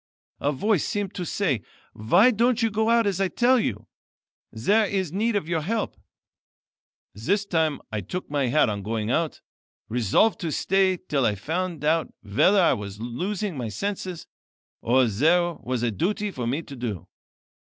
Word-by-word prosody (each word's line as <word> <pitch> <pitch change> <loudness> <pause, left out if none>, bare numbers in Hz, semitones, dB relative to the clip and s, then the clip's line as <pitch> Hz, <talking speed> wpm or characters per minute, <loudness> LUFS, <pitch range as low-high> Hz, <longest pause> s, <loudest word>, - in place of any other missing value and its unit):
A 145 - +1
voice 185 +6 +1
seemed 205 -1 -2
to 180 - -4
say: 150 - 0 0.3
'Why 175 - +4
don't 235 +1 +2
you 225 - +2
go 220 +2 +1
out 230 -1 +4
as 195 -2 0
I 195 - +3
tell 250 +6 +3
you? 110 - -2 0.7
There 205 - +2
is 190 -5 -1
need 215 +5 0
of 195 -6 -1
your 165 -2 0
help.' 215 +7 -2 1.2
This 190 - 0
time 160 -6 0
I 110 -1 -2
took 180 - -5
my 145 -3 0
hat 150 +4 +3
on 105 -2 -2
going 110 +2 -2
out, 165 +3 -1 0.5
resolved 120 - +2
to 165 -3 -3
stay 190 +3 +2
till 145 -6 -1
I 105 -3 +2
found 165 - -3
out 160 +1 +1
whether 120 - +3
I 175 - +5
was 100 -1 -6
losing 185 - -3
my 120 -4 -4
senses, 185 - -4 0.6
or 125 +2 +3
there 165 - +2
was 125 -1 -2
a 120 - +1
duty 200 - -1
for 125 -8 -4
me 140 +7 -1
to 140 - -10
do. 115 -8 -5
165 Hz, 175 wpm, -25 LUFS, 120-200 Hz, 1.2 s, I